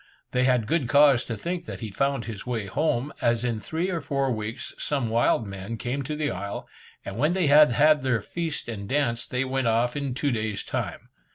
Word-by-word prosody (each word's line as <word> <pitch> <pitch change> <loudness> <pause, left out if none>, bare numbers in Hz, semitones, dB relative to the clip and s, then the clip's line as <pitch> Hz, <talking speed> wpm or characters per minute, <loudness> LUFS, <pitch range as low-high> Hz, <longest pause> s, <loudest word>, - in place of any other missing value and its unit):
They 125 0 +2
had 125 -4 +3
good 135 0 0
cause 140 -3 +5
to 115 - -4
think 175 - -3
that - - -7
he 110 -3 -5
found 135 +2 0
his 110 -4 -6
way 120 -4 -3
home, 135 +4 0
as 120 0 +2
in 115 -3 -1
three 165 - -2
or 170 -3 -2
four 140 -2 0
weeks 110 0 -4
some 135 -6 -1
wild 115 0 +2
men 100 +3 -6
came 125 +4 -2
to 150 +3 -4
the 150 -1 -1
isle, 100 +2 -5 0.4
and 100 +3 -6
when 150 +6 +3
they 185 -2 +1
had 145 -2 +7
had 150 +3 +5
their 130 -3 +1
feast 160 +8 -4
and 100 -3 -6
dance, 130 -5 +1
they 125 +1 -1
went 130 -1 -1
off 115 +2 +2
in 140 -3 -2
two 145 +1 0
days' 110 -3 -2
time. - - -4
125 Hz, 215 wpm, -26 LUFS, 115-145 Hz, 0.4 s, had